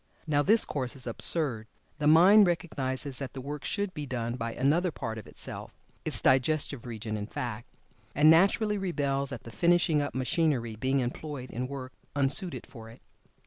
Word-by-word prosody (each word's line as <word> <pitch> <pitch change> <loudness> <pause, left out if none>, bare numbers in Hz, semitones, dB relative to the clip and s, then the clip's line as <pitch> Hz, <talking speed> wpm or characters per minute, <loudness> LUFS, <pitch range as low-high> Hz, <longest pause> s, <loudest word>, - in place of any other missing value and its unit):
Now 145 -3 +2
this 215 +8 +4
course 130 -3 -4
is 130 - -3
absurd. 120 -1 +1 0.3
The 150 - +1
mind 185 +6 +7
recognizes 140 -6 -2
that 135 -2 -6
the 135 - -7
work 145 +2 -6
should 200 -2 -2
be 150 -1 -6
done 120 -2 -3
by 115 -2 -4
another 165 +7 +1
part 115 -7 -5
of 105 - -12
itself - - -8 0.3
its - - -1
digestive 135 -1 +1
region, 110 -2 -5
in 105 -1 -4
fact 120 -1 -5 0.5
and 145 +2 +5
naturally 200 +6 +4
rebels 140 -7 -1
at - - -7
the 115 - -10
finishing 170 - +2
up 145 - -4
machinery 130 -3 0
being 130 +4 0
employed 130 +1 -5
in 125 +2 -3
work 130 -2 -7 0.2
unsuited 145 +6 +1
for 115 -4 -12
it. 115 - -14
140 Hz, 175 wpm, -28 LUFS, 125-160 Hz, 0.5 s, mind